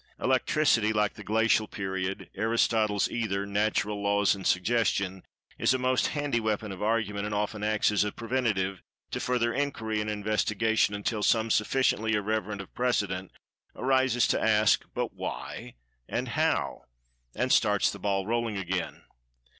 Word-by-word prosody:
"Electricity," 130 -4 +2
like 105 -1 +1
the 105 - -11
"Glacial 110 +1 +2
Period," 95 -1 -4
"Aristotle's 110 -1 +1
Ether," 100 -4 -2
"Natural 105 0 0
Laws," 100 0 +3
and 95 -2 -4
"Suggestion," 95 -2 +1 0.4
is 130 - +3
a - - +1
most 130 0 +1
handy 145 -5 -1
weapon 110 -1 -2
of 95 - -8
argument, 105 -2 0
and 105 - -3
often 105 0 -2
acts 110 0 +2
as 105 - +2
a 105 - -2
preventative 110 -6 -1 0.3
to - - -2
further 120 -2 0
inquiry 115 -6 -1
and 105 - -3
investigation 105 0 +1
until 105 +1 -2
some 110 +1 +2
sufficiently 110 0 +2
irreverent 105 -1 -2
of 95 - -13
precedent 100 -7 -1 0.5
arises 130 -2 +2
to - - +1
ask, 110 -1 +3
"But - - -2
Why - - -6 0.3
and - - -2
How?" - - 0 0.5
and 125 +1 +1
starts 105 -3 +3
the 100 - -9
ball 95 0 0
rolling 115 -1 -1
again. 95 -1 -3
105 Hz, 145 wpm, -28 LUFS, 100-115 Hz, 0.5 s, Laws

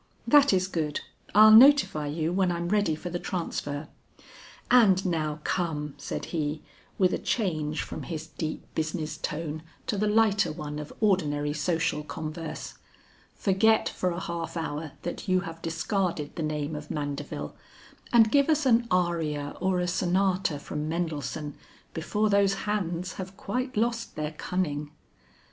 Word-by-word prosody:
"That 285 -2 +6
is 185 -1 +3
good, 155 -5 -2 0.3
I'll 215 +1 +9
notify 235 - +7
you 160 +3 -1
when 185 -1 +2
I'm 170 0 -2
ready 205 -6 +2
for 175 +3 -6
the 175 - -2
transfer. 155 -5 -3 0.8
And 200 -7 +6
now 155 -4 -1
come," 150 -5 -1
said - - -4
he, 150 -1 -2 0.3
with 185 -2 +3
a - - -1
change 155 -8 -1
from - - -6
his 160 -2 -5
deep 155 -1 -5
business 160 0 -2
tone 155 0 -4 0.2
to 210 -6 -1
the 210 - +2
lighter 210 -5 +3
one 150 -1 -5
of 150 - -7
ordinary 150 -8 +2
social 160 -1 0
converse, 160 +1 -6 0.6
"forget 220 +3 +3
for 185 - -1
a 175 0 -3
half 170 -2 -4
hour 155 -2 -4
that 175 - -5
you 185 -1 +3
have 165 -3 -8
discarded 165 -2 -2
the - - -3
name 155 0 -2
of 150 0 -7
Mandeville, 145 - -4 0.6
and 225 -2 +6
give 280 +1 +4
us 305 -2 +2
an 235 -2 +4
aria 165 -6 0
or 185 0 +1
a 180 - 0
sonata 185 -1 +1
from 150 +1 -4
Mendelssohn 155 -3 -3 0.4
before 210 +6 0
those 200 -1 +4
hands 180 -4 -2
have 190 +1 -9
quite 250 +5 -3
lost 230 +1 0
their 150 0 -3
cunning." 150 -3 -2
170 Hz, 150 wpm, -27 LUFS, 155-195 Hz, 0.8 s, I'll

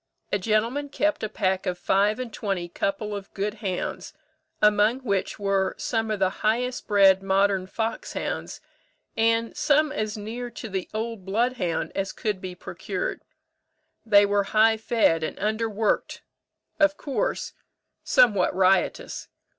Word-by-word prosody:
A 205 - +1
gentleman 230 +8 0
kept 300 +2 0
a 215 - -2
pack 190 -2 -1
of 180 -1 -1
five 200 +4 +2
and 245 -3 -5
twenty 195 -4 -2
couple 200 +4 -2
of 200 -1 -8
good 200 +1 -1
hounds, 185 -4 -3 0.5
among 210 +4 +3
which 200 -6 -1
were 195 -2 0
some 225 -1 -1
of 215 - 0
the 190 -1 +2
highest 245 +4 0
bred 195 -2 +5
modern 195 -1 +2
foxhounds, 225 +3 -4 0.5
and 230 0 +1
some 300 +1 +3
as 215 -5 -3
near 230 +4 -5
to 230 -1 -8
the 190 -2 -4
old 220 -2 -4
bloodhound 200 -3 -1
as 195 0 -2
could 210 -4 -3
be 185 -1 -6
procured. - - -4 0.8
They 205 -2 +6
were 200 0 +1
high 220 +1 +6
fed 220 -7 +2
and 155 - -4
underworked; 220 0 -1 0.6
of 300 -1 +4
course, 405 - -2 0.5
somewhat 210 -8 +4
riotous. 190 +1 +1
210 Hz, 140 wpm, -25 LUFS, 195-230 Hz, 0.8 s, They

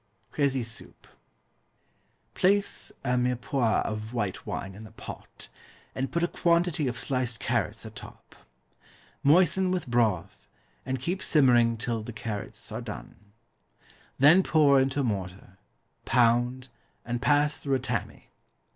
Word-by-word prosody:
Crécy 135 -4 +1
Soup. 115 0 -9 1.3
Place 190 - +1
a 125 0 +1
mirepoix 125 -1 +1
of 110 +2 -5
white 105 -6 -3
wine 95 0 -4
in 100 - -11
the 110 - -10
pot, 110 - -9 0.5
and 135 +1 -3
put 170 - 0
a - - +3
quantity 170 -4 +1
of 120 -1 -3
sliced 125 -3 -2
carrots - - -1
atop. - - -12 0.9
Moisten 185 +5 +4
with 180 -1 -1
broth, 115 -8 0 0.4
and 130 0 -1
keep 175 +9 -2
simmering 120 -6 +4
till 115 0 -2
the 110 +2 -8
carrots 105 -1 -5
are - - -4
done. - - -8 1.0
Then 155 +7 +7
pour 145 -6 +4
into 135 +2 0
a - - 0
mortar, 95 -3 -4 0.4
pound, 120 +2 +2 0.4
and 120 0 -3
pass 145 +1 +3
through 140 -2 0
a - - 0
tammy. - - -4
125 Hz, 130 wpm, -27 LUFS, 115-145 Hz, 1.3 s, Then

